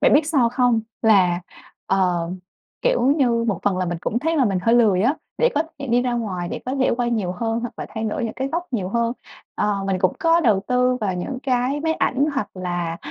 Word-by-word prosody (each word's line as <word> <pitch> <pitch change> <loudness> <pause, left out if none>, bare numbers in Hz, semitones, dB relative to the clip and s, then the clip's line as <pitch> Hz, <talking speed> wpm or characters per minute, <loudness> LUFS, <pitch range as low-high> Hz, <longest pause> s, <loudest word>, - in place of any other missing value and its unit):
bạn 290 - +4
biết 295 +1 +4
sao 270 -7 +3
không? 245 -2 +2 0.2
Là, 185 -5 +4 0.5
ờ, 180 -3 +1 0.5
kiểu - - +2 0.2
như, 235 -4 +2
một 195 - 0
phần 200 -3 +1
là 185 - 0
mình 170 -1 -3
cũng 235 - -1
thấy 325 +4 0
là 270 - +4
mình 195 -5 +1
hơi 230 +1 +3
lười 210 -6 +4
á, 270 +6 +3 0.2
để 485 - +4
có 300 - +2 0.2
thể 280 - -5
đi 245 +1 +2
ra 250 -1 -1
ngoài, 190 -7 -3
để - - -5
có 260 - -1
thể 260 - +3
quay 240 -1 0
nhiều 200 -6 -1
hơn, 225 +4 -2
hoặc 240 - -5
là - - -5
thay 220 0 -3
đổi 220 +2 -2
những 220 - -4
cái 265 +1 -2
góc 345 +4 -3
nhiều 190 -6 -1
hơn. 235 +2 0 0.4
Ờ, 200 -2 0
mình 190 -1 0
cũng - - +2
có 335 -2 +3
đầu 215 -9 +3
tư 250 0 +2
vào 195 -4 -1
những 255 +9 -4
cái 260 +2 0
máy 320 0 0
ảnh, 270 -1 +1
hoặc 210 -6 -1
là, 175 -2 -3
235 Hz, 245 wpm, -22 LUFS, 195-260 Hz, 0.5 s, bạn